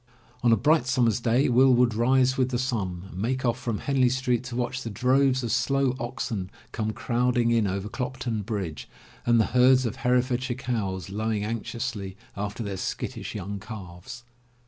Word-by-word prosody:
On 120 -2 +4
a 115 - +5
bright 150 +2 +3
summer's 120 -3 +2
day 120 +3 +2
Will 130 +1 +5
would 120 -1 +3
rise 130 +3 +3
with 130 -1 +1
the 125 - -1
sun 100 -8 -2
and 95 - -6
make 130 +4 -1
off 120 +1 +1
from 115 -4 -2
Henley 130 0 +2
Street 125 -1 0
to 125 -1 -6
watch 125 +1 -2
the 115 - -5
droves 130 +4 +2
of 115 - -2
slow 135 +1 +1
oxen 120 -5 -3 0.2
come 110 -1 -2
crowding 120 +1 +1
in 115 -3 +3
over 100 +1 -2
Clopton 125 -2 -3
Bridge, 95 - -4 0.4
and 120 -1 +5
the 110 - +4
herds 125 +1 +5
of 115 - -3
Herefordshire 125 0 +1
cows, 100 -8 -3
lowing 110 0 -1
anxiously 110 -3 -4 0.2
after 105 +3 -4
their 100 -2 -4
skittish - - -4
young 100 0 -4
calves. 105 +2 -9
120 Hz, 175 wpm, -26 LUFS, 105-125 Hz, 0.4 s, a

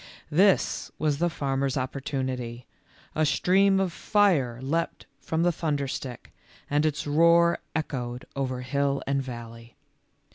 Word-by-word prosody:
This 190 +5 +3
was 150 -2 0
the 175 +1 +2
farmer's 135 -3 -1
opportunity 130 -2 -3 0.2
— - - -28
a 155 - +2
stream 190 +6 +3
of 190 -3 0
fire 165 - +2
leaped 160 +6 -2
from 160 +3 -1
the 175 - +4
thunderstick, 140 -6 -3 0.4
and 150 +2 +3
its 150 - -2
roar 170 +3 +4 0.2
echoed 125 -6 -3
over 130 -2 -2
hill 140 +2 0
and 140 0 0
valley. 115 -2 -9
140 Hz, 130 wpm, -27 LUFS, 130-165 Hz, 0.4 s, the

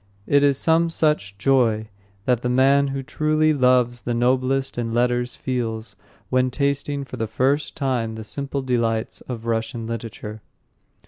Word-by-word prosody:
It 145 +4 +4
is 140 -2 +3
some 165 +2 +3
such 150 -12 0
joy 110 -3 +2 0.4
that 125 -2 +2
the 125 - -1
man 135 +3 +4
who 135 0 -3
truly 155 +3 +1
loves 125 -3 +3
the 120 - -2
noblest 130 +2 +1
in 115 -1 -2
letters 120 0 +1
feels 115 -3 -3 0.4
when 130 0 +3
tasting 140 +1 -1
for - - -8
the 110 - -2
first 135 +6 0
time 120 -5 -1
the 110 - -6
simple 140 +4 -4
delights 115 -3 -1
of 115 -2 -5
Russian 115 0 -2
literature. 110 -2 -6
125 Hz, 150 wpm, -23 LUFS, 115-140 Hz, 0.4 s, It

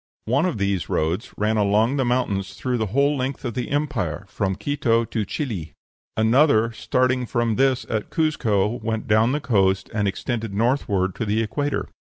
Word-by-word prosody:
One 140 +10 +2
of 175 - -2
these 100 -5 -1
roads 85 +9 -1
ran 110 +1 +1
along 105 +6 +2
the 135 - +2
mountains 110 -6 -1
through 125 -2 -2
the 110 - 0
whole 140 +7 +2
length 135 +1 -3
of 120 - -2
the 125 +1 -3
empire, 140 - -2
from 95 -1 -2
Quito 115 0 +1
to 110 -2 -2
Chili; 105 - -4 0.4
another, 115 0 +4
starting 125 +2 0
from 120 -2 0
this 130 0 +2
at 110 -2 -2
Cuzco, 115 -9 +1
went 110 0 -3
down 110 +1 +4
to - - 0
the 150 - -1
coast, 95 -6 +1
and 105 -2 +1
extended 110 +1 -3
northward 100 -5 +1
to 115 - -2
the 110 +2 +1
equator. 145 +5 -2
115 Hz, 180 wpm, -23 LUFS, 105-130 Hz, 0.4 s, another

